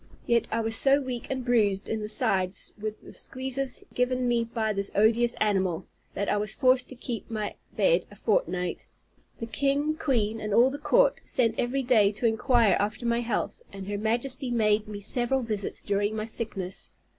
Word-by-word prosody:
Yet 235 -1 +2
I 230 - 0
was 225 0 -1
so 275 +3 +4
weak 255 -4 -5
and 260 -2 -3
bruised 210 -5 +2
in 220 - -2
the 210 - -4
sides 190 -5 0
with 215 0 -6
the - - -13
squeezes 265 0 -1
given 250 0 0
me 240 -1 +2
by 225 -2 -2
this 200 0 0
odious 230 +3 +3
animal, 190 -5 0 0.3
that 200 - -2
I 205 - +1
was 210 +1 -1
forced 255 -2 +3
to 260 - -9
keep 240 -2 -5
my 215 -2 -3 0.2
bed - - +2
a - - -14
fortnight. 180 - -1 0.5
The 230 - -5
king, 280 +6 0
queen, 225 -8 0
and 210 -1 -1
all 250 +3 +5
the 285 - -5
court, - - +3
sent 230 -3 0
every 265 +3 0
day 220 -5 +4
to 215 - -3
inquire 230 -1 +3
after 215 +4 -2
my 235 0 +1
health, 240 -2 -2
and 195 -1 -8
her 205 0 -2
Majesty 245 +4 -1
made 215 -2 +2
me 205 -1 -7
several 245 +5 +2
visits 210 -4 -2
during 205 +1 0
my 215 0 -3
sickness. 210 -5 -3
230 Hz, 190 wpm, -27 LUFS, 210-255 Hz, 0.5 s, all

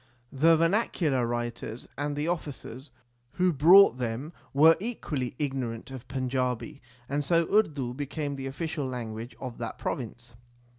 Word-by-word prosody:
The 160 +4 +5
vernacular 165 - +1
writers 120 -1 -4
and 145 +1 -2
the 150 +2 -2
officers 145 -5 -5 0.4
who 180 -1 +2
brought 165 0 +7
them 125 +7 -3 0.2
were 160 +4 +7
equally 150 - -3
igno 135 -4 -1
rant 115 +3 -10
of 130 -1 -9
Panjabi, 130 +2 -2 0.3
and 145 +2 -1
so 165 +3 +3
Urdu 145 - +2
became 145 +1 -4
the 135 -1 -5
official 150 +1 -3
lan 120 -4 -4
guage 115 +3 -7
of 125 -3 -7
that 115 -2 -5
province. 120 -1 -5
135 Hz, 145 wpm, -28 LUFS, 125-155 Hz, 0.4 s, brought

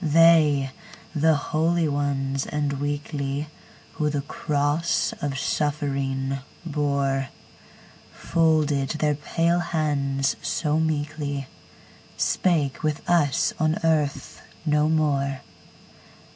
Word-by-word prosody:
They, 155 -4 +5 0.4
the 160 0 +3
holy 160 +3 +1
ones 140 -2 -1
and 145 -1 -1
weakly, 145 0 -3 0.4
Who 150 -1 0
the 145 -1 -1
cross 145 +3 0
of 140 -2 -2
suffering 135 -2 -1 0.3
bore, 140 -3 0 0.8
Folded 155 -4 +1
their 150 -1 +2
pale 165 +4 0
hands 145 -5 0
so 155 -1 0
meekly, 150 -2 -2 0.7
Spake 155 -7 +1
with 155 -1 -2
us 150 -6 +2
on 155 0 +2
earth 150 -4 0 0.2
no 150 0 +3
more! 140 -4 +1
145 Hz, 90 wpm, -24 LUFS, 140-155 Hz, 0.8 s, They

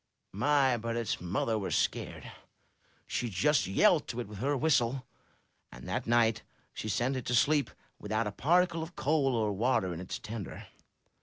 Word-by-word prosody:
My, 135 +3 +2
but 115 +1 -3
its 115 -7 -2
mother 105 +5 -1
was 100 - -2
scared! - - -2 0.7
She 120 - -2
just 115 - +2
yelled 155 - +3
to 120 - -4
it 120 - -4
with 105 -1 -9
her 140 +4 0
whistle; 130 -3 +1 0.7
and 60 +1 -11
that - - -3
night 115 -1 +3 0.3
she 110 - -5
sent 120 +6 0
it 125 - -5
to 125 - +1
sleep 145 +1 +3 0.3
without 110 +2 -1
a 105 - -2
particle 170 - +2
of 165 +2 -7
coal 140 -3 +1
or 110 -3 0
water 100 -4 +1
in 85 - -6
its 90 - -5
tender. 110 -3 -7
120 Hz, 170 wpm, -30 LUFS, 105-140 Hz, 0.7 s, yelled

